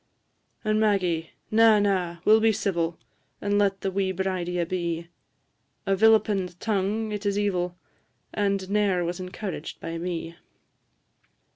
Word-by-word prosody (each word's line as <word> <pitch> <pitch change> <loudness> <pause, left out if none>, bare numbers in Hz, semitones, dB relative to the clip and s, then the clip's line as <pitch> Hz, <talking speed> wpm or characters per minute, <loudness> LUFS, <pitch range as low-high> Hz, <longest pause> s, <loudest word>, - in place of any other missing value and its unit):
And 215 -1 +1
Maggie 180 -6 +1 0.2
na, 225 0 +6
na! 185 -4 0
we - - +5
'll 220 - +7
be 220 0 +4
civil, 170 -5 -1 0.4
And 205 0 +1
let 195 -1 +1
the 195 - -1
wee 190 0 0
bridie 185 -1 -2
abee; 170 -1 -2 0.8
A 195 -1 +2
vilipend 200 -4 +3
tongue 215 +1 -1
it 210 0 -4
is 200 -1 0
evil, 180 -4 -1 0.6
And 200 -2 0
ne'er 200 -4 +2
was 175 +1 -3
encouraged 185 -2 -6
by 165 0 -5
me. 170 -1 -4
195 Hz, 135 wpm, -26 LUFS, 175-205 Hz, 0.8 s, ll